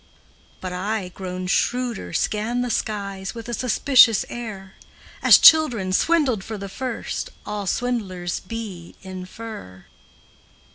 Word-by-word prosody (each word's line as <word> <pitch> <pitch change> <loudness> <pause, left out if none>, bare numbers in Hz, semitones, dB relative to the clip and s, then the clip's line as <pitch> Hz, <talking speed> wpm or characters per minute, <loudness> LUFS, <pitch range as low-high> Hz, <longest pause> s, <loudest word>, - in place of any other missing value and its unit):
But 185 -1 -5
I, 195 +1 -2
grown 185 0 -6
shrewder, 245 +4 -1
scan 215 +8 -1
the 245 -1 -2
skies 195 -2 -3
With 230 -1 -8
a 240 - -4
suspicious 250 -1 +4
air, 200 -5 -7 0.5
As - - +8
children, 240 -13 +6
swindled 270 - +2
for 220 +1 -6
the 200 0 -7
first, 250 +3 -4 0.2
All 210 -2 -4
swindlers 190 -6 -2
be, 195 -5 -8
infer. 185 - -9
210 Hz, 115 wpm, -23 LUFS, 185-240 Hz, 0.5 s, As